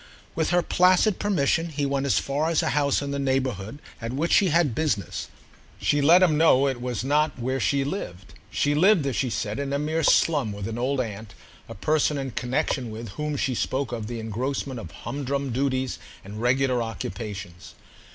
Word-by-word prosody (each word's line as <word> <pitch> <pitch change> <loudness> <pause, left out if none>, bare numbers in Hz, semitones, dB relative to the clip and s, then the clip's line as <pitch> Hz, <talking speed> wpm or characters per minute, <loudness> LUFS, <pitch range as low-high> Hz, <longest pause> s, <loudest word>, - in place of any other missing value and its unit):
With 160 -1 0
her 175 -1 +3
placid 185 +4 +3
permission 170 -4 +1
he 145 -2 -2
went 140 0 -1
as - - +3
far 145 +4 0
as 165 - +2
a - - 0
house 145 -1 +1
in 140 - -4
the 140 - -2
neighbourhood 130 -5 -1 0.2
at 115 +1 -4
which 150 +6 -1
she 200 - +5
had 165 -5 +2
business: 110 - -2 0.5
she 145 - +1
let 170 +6 +6
him 155 -4 +3
know 140 -4 +5
it 130 -3 -2
was 125 -3 -3
not 150 +2 +1
where 130 +2 -2
she 135 +5 +1
lived. 100 - -6 0.2
She 145 - +1
lived, 175 +1 +4
as 135 -3 -1
she 130 - 0
said, 105 0 -3
in 140 -1 -3
a 140 - +1
mere 155 +3 -1
slum, 145 -7 +3
with 100 -1 -5
an 115 +1 -4
old 130 +2 0
aunt, 110 -3 -7 0.3
a 115 - -7
person 150 +6 +1
in 135 -1 -4
connexion 125 +1 -1
with 110 +1 -7
whom 150 +7 -3
she 130 -2 0
spoke 130 +2 -2
of 115 -3 -4
the 120 0 -5
engrossment 125 +4 -3
of 85 - -8
humdrum 140 +4 -4
duties 130 0 -1 0.3
and 105 +3 -7
regular 125 0 +2
occupations. 100 -4 -6
135 Hz, 195 wpm, -25 LUFS, 115-150 Hz, 0.5 s, let